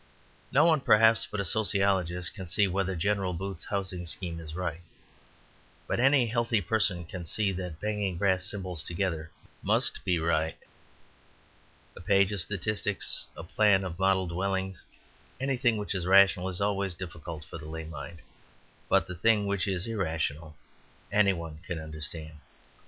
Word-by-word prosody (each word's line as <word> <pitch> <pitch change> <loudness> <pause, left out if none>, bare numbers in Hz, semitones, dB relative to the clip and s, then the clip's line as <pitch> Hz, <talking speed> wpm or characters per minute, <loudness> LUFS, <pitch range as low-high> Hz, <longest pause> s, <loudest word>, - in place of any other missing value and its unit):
No 150 +4 +5
one, 160 -4 +4
perhaps, 110 -1 +5
but 105 - -4
a 100 - -1
sociologist 95 -3 +1
can 95 -4 -8
see 100 +4 +2
whether 95 0 -1
General 95 +1 0
Booth's 95 0 -5
housing 95 -3 -3
scheme 85 -1 -2
is 80 -1 -8
right. 85 -2 -3 1.0
But - - -1
any 135 0 +5
healthy 115 -1 +1
person 100 -2 0
can 90 +2 -7
see 100 +5 0
that 90 -3 -5
banging 105 -3 -1
brass 95 -1 +2
cymbals 90 -5 -3
together 85 -2 -2 0.3
must - - +1
be 90 -3 +2
right. 80 -1 0 1.4
A - - -10
page 100 +1 +3
of 100 -3 -2
statistics, 105 +2 -2
a - - -6
plan 100 +2 +3
of 90 -2 -5
model 95 0 +3
dwellings, 95 +1 -2 0.6
anything 125 -4 +1
which 105 +1 -3
is 90 -2 -2
rational, 95 -1 +5
is 90 +1 -3
always 100 -2 0
difficult 80 -2 -7
for 80 - -8
the 80 0 -9
lay 80 0 -5
mind. 80 +1 -8 0.7
But - - +4
the 90 - -6
thing 105 +3 +3
which 100 0 0
is 95 -2 -1
irrational 80 -7 -2 0.6
any 100 -1 +4
one 85 -3 -7
can 90 - -3
understand. 80 0 -6
95 Hz, 155 wpm, -29 LUFS, 85-100 Hz, 1.4 s, No